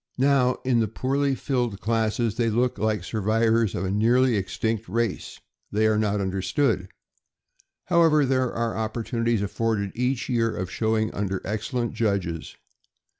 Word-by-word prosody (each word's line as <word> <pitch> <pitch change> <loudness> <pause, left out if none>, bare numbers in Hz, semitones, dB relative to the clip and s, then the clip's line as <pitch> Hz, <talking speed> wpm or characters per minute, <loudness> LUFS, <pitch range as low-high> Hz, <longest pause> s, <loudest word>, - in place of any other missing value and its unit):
Now, 130 -1 +3
in 125 -2 +3
the 110 - +2
poorly 135 +5 0
filled 120 -7 -2
classes, 115 +1 0
they 115 -1 +1
look 125 +3 0
like 110 -4 0
survivors 110 +1 +1
of - - -2
a 95 - -1
nearly 120 +4 +3
extinct 110 +3 -2
race. 115 -3 -2 0.3
They 110 +1 +2
are 110 -1 +3
not 105 -1 0
understood. 95 +3 0 1.0
However, 165 -4 +4
there 130 -1 +1
are 115 -1 -2
opportuni 115 +1 -3
ties 115 -4 +2
afforded 100 -1 -1
each 125 +1 -1
year 115 -2 +1
of 90 0 -4
showing 110 +1 0
under 100 -2 -2
excellent 120 +3 -2
judges. 95 -7 -2
115 Hz, 145 wpm, -25 LUFS, 105-125 Hz, 1.0 s, However